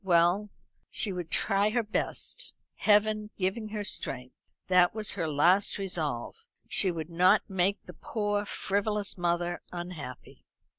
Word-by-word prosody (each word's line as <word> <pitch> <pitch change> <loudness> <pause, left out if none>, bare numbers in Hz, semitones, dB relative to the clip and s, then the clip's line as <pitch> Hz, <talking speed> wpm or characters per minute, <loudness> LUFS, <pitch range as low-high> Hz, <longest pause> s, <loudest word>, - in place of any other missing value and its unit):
Well, 180 +3 +3 0.4
she 205 -4 -1
would 175 -3 -5
try 200 +4 +3
her 235 +2 +1
best, 210 +1 -3 0.2
Heaven 210 0 +3
giving 195 +4 -1
her 210 -1 -3
strength. 130 -9 -2 0.3
That 180 +1 +4
was 215 -2 -1
her 170 -4 -2
last 175 +7 +3
resolve. 170 - -3 0.2
She 190 - +4
would 165 -1 -4
not 185 +5 +4
make 190 +1 0
the 180 - -11
poor 205 +3 -2
frivolous 205 0 -1
mother 175 0 -1
unhappy. 175 -8 -8
190 Hz, 135 wpm, -29 LUFS, 175-210 Hz, 0.4 s, That